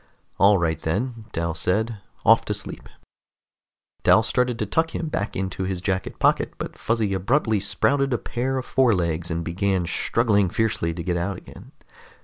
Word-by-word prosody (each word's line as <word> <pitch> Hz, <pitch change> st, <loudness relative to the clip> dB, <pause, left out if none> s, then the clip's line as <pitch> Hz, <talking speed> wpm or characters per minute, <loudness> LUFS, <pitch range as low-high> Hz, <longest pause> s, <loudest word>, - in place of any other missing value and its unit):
"All 100 Hz, +1 st, +6 dB
right, 80 Hz, -3 st, -1 dB
then," 110 Hz, +7 st, -2 dB
Dal 85 Hz, -1 st, -2 dB
said. 105 Hz, +6 st, -1 dB, 0.3 s
"Off -, -, +6 dB
to -, -, -1 dB
sleep." -, -, -8 dB, 1.1 s
Dal 110 Hz, -, +5 dB
started 125 Hz, +1 st, 0 dB
to 110 Hz, -, -1 dB
tuck 160 Hz, +10 st, 0 dB
him 165 Hz, -, -2 dB
back 100 Hz, -8 st, -3 dB
into 95 Hz, 0 st, -3 dB
his 95 Hz, -1 st, -2 dB
jacket 95 Hz, 0 st, -2 dB
pocket, -, -, +2 dB
but -, -, -6 dB
Fuzzy 110 Hz, -3 st, 0 dB
abruptly 110 Hz, +3 st, +1 dB
sprouted 135 Hz, +7 st, +1 dB
a 120 Hz, -, +2 dB
pair 130 Hz, +3 st, -2 dB
of 130 Hz, -, -3 dB
forelegs 85 Hz, -10 st, +1 dB
and 85 Hz, 0 st, -2 dB
began 95 Hz, +1 st, 0 dB
struggling 105 Hz, +1 st, +1 dB
fiercely 105 Hz, -5 st, 0 dB
to 85 Hz, 0 st, -5 dB
get 90 Hz, -1 st, -1 dB
out 90 Hz, +2 st, -2 dB
again. -, -, -13 dB
100 Hz, 165 wpm, -24 LUFS, 90-115 Hz, 1.1 s, All